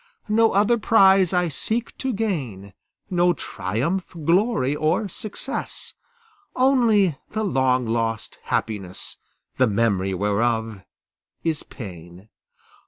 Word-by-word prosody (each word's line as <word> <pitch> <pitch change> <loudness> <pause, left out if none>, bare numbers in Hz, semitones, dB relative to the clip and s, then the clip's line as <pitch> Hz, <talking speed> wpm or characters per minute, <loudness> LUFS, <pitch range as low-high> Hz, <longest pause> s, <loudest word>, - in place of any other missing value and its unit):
No 225 +1 +4
other 215 +4 +3
prize 195 -4 +5
I 180 -1 +2
seek 220 - -3
to 265 - -1
gain, 135 - -3 0.4
No 175 0 +3
triumph, 160 - -3
glory, 175 - +2
or 160 +8 +1
success, 205 +3 -6 0.6
Only 225 - +3
the 220 0 -1
long 130 - +2
lost 115 -1 -2
happiness, 95 -5 -3 0.4
The 130 - +4
memory 100 -3 +1
whereof 110 +2 0 0.6
is 160 -3 -1
pain. 90 -2 -11
150 Hz, 105 wpm, -23 LUFS, -, 0.6 s, prize